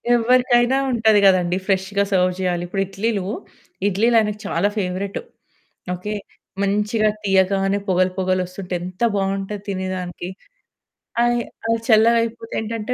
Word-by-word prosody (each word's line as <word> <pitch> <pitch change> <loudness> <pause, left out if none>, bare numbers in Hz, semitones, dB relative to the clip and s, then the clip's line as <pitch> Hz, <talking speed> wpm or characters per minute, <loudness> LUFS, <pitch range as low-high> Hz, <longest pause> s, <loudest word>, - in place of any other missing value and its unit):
ఎవ్వరికైనా 245 +1 +3
ఉంటది 220 -3 +4
గదండీ! 180 -1 +3
ఫ్రెష్‌గా 195 +1 +1
సర్వ్ 180 -1 +3
జేయాలి. 175 -2 -1
ఇప్పుడు 195 +2 -2
ఇడ్లీలు, 195 0 -2 0.6
ఇడ్లీలు 225 +5 +2
ఆయనకు 210 -1 -1
చాలా 200 +4 +1
ఫేవరెటు. 190 - -2 0.7
ఓకే. 210 +4 -5 0.5
మంచిగా 210 +2 +1 0.2
తీయగానే 195 +1 +2
పొగలు 185 0 +3
పొగలొస్తుంటే 185 0 -2
ఎంత 185 +4 -7
బావుంటది 195 +1 -2
తినేదానికి! 185 -2 -4 0.9
ఆయి 240 0 +2 0.3
అయి 230 0 +2
చల్లగయిపోతే 230 0 +3
ఏంటంటే 225 +2 -3
200 Hz, 110 wpm, -21 LUFS, 185-220 Hz, 0.9 s, ఉంటది